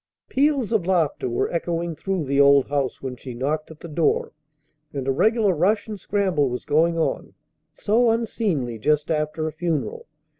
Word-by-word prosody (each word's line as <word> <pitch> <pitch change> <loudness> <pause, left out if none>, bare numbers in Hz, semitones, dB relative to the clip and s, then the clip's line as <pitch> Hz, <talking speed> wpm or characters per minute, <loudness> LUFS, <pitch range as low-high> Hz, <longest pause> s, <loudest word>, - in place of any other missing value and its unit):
Peals 275 -4 +1
of 205 -6 +1
laughter 165 -8 +1
were 120 - -1
echoing 170 -1 -2
through 190 -1 -2
the 140 +1 +3
old 140 -1 +6
house 140 -3 -2
when 130 -1 -4
she 125 0 -9
knocked 150 +5 -2
at 160 -1 -13
the - - -7
door, 160 0 0 0.6
and 135 -2 -4
a - - +3
regular 215 - +3
rush 195 +8 +1
and 210 -2 -6
scramble 185 -8 +1
was 125 0 -5
going 165 +3 +2
on, 165 - -2 0.4
so 230 +3 +2
unseemly 200 - -1
just 150 +5 +1
after 155 0 -1
a - - -3
funeral! 155 -9 -3
160 Hz, 175 wpm, -23 LUFS, 140-195 Hz, 0.6 s, old